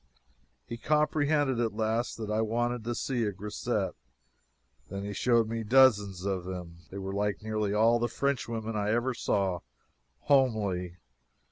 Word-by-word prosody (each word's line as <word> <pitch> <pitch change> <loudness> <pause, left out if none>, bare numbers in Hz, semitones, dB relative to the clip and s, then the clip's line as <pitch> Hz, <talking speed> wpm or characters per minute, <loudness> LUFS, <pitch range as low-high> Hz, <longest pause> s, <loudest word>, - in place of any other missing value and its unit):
He 115 - -6
comprehended 150 -3 +2
at 115 -3 0
last 110 +2 -1
that 110 -2 -4
I 110 +1 +1
wanted 120 +1 -1
to 120 0 -2
see 125 -2 -1
a 105 - 0
grisette. 100 +2 -2 1.0
Then 100 +1 -5
he 100 0 -4
showed 115 0 +2
me 115 0 -3
dozens 105 -6 +4
of 95 -3 -1
them. 90 -2 -7
They 95 - -8
were 95 0 -4
like 100 -3 -1
nearly 110 -2 -1
all 115 +2 +4
the 120 - +1
Frenchwomen 115 -3 -2
I 105 0 0
ever 120 +4 +1
saw 95 -6 0 0.6
homely. 105 -11 +1
110 Hz, 150 wpm, -29 LUFS, 100-120 Hz, 1.0 s, dozens